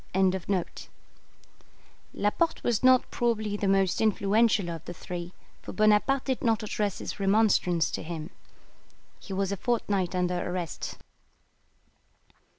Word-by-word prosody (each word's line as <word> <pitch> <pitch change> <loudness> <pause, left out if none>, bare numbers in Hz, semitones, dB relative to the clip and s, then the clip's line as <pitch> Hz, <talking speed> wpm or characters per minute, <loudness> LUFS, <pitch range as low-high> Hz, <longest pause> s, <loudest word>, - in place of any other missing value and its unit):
] - - -11 2.0
Laporte 265 +12 0
was 235 -3 +1
not 255 -1 +5
probably 220 -3 0
the 205 -1 -1
most 195 -1 +2
influential 215 -1 +2
of 165 -1 -7
the 175 - -7
three, 175 0 -6 0.3
for - - -8
Bonaparte 215 +5 +3
did 260 -2 -1
not 225 -2 +1
address 210 -1 -2
his - - -6
remonstrance 195 -4 +2
to - - -3
him. 160 +1 -6 0.9
He - - -12
was 195 0 -1
a 200 - -2
fortnight 200 -5 -1
under 180 0 0
arrest. 175 -3 -4
200 Hz, 125 wpm, -28 LUFS, 180-220 Hz, 2.0 s, not